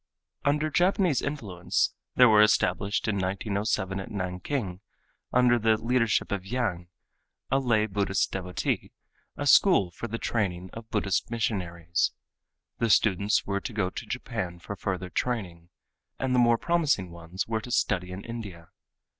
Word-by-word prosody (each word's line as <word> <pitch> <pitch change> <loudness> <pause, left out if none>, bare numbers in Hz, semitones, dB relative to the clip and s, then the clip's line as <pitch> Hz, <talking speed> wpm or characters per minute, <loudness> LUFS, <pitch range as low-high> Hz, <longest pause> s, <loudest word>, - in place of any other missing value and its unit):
Under 150 +2 +1
Japanese 180 -3 +2
influence 100 -12 -1 0.2
there 125 - +8
was 105 -1 +6
established 100 0 +1
in 105 -2 0
1907 100 0 -1
at 95 - -6
Nanking, 90 +1 -3 0.5
under 125 -1 +4
the 110 0 +3
leadership 115 0 +1
of 100 -2 -2
Yang, 95 -6 -2 0.6
a 135 - +4
lay 115 -5 +2
Buddhist 100 -2 0
devotee, 90 -1 -2 0.4
a 145 - -3
school 140 - +5
for 120 - -6
the 115 +1 -3
training 95 -6 -2
of 115 0 -9
Buddhist 100 -2 0
missionaries. 90 -7 -1 0.7
The 115 0 +1
students 105 0 +3
were 100 0 -1
to 120 - -6
go 95 -4 0
to - - -6
Japan 115 -9 -4
for 95 +4 -7
further 95 -2 -4
training, 90 -9 -3 0.5
and 130 -1 -1
the 125 - +4
more 120 -1 +5
promising 150 - +1
ones 85 +2 -5
were 110 -1 -1
to 125 - -9
study 90 -6 0
in 95 +2 -7
India. 100 -8 -8
105 Hz, 145 wpm, -27 LUFS, 95-120 Hz, 0.7 s, there